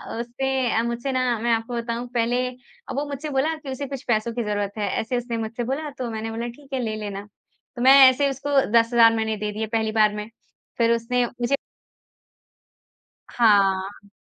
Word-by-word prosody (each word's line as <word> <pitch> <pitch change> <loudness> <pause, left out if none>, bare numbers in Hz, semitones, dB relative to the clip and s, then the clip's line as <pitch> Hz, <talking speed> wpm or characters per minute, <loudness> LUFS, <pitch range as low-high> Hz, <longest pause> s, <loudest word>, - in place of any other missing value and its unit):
अ, - - -4
उसने 260 +1 -1
अ, - - +1
मुझसे 235 +3 -2
ना 250 -3 0
मैं 235 +1 0
आपको 225 +2 -2
बताऊँ 235 +1 -3
पहले 245 +2 +1
अब 250 0 -12
वो 295 - -2
मुझसे 285 +2 -5
बोला 290 +4 0
कि 295 -3 -10
उसे 280 +2 -4
कुछ 275 0 -6
पैसों 230 0 0
की 240 -1 -2
जरूरत 205 -1 -2
है। 205 -2 -1
ऐसे 245 +3 -2
उसने 235 -1 -3
मुझसे 225 +2 -4
बोला 285 +5 -3
तो 250 -2 -3
मैंने 220 0 -4
बोला 230 +1 -4
ठीक 270 +3 -12
है 260 - 0
ले 215 -1 -2
लेना। 205 -1 -6 0.5
तो 240 - -5
मैं 260 +1 +7 0.2
ऐसे 280 +2 +1
उसको 275 +1 -5 0.2
10000 230 0 +5
मैंने 220 -1 -1
दे 210 0 -3
दिए 220 +1 -3
पहली 220 -1 +1
बार 215 -1 +3
में। 210 +1 -6 0.5
फिर 230 -1 +3
उसने 245 +1 0
मुझे 240 +3 -1 1.8
हाँ। 200 -2 +2
235 Hz, 195 wpm, -23 LUFS, 220-255 Hz, 1.8 s, मैं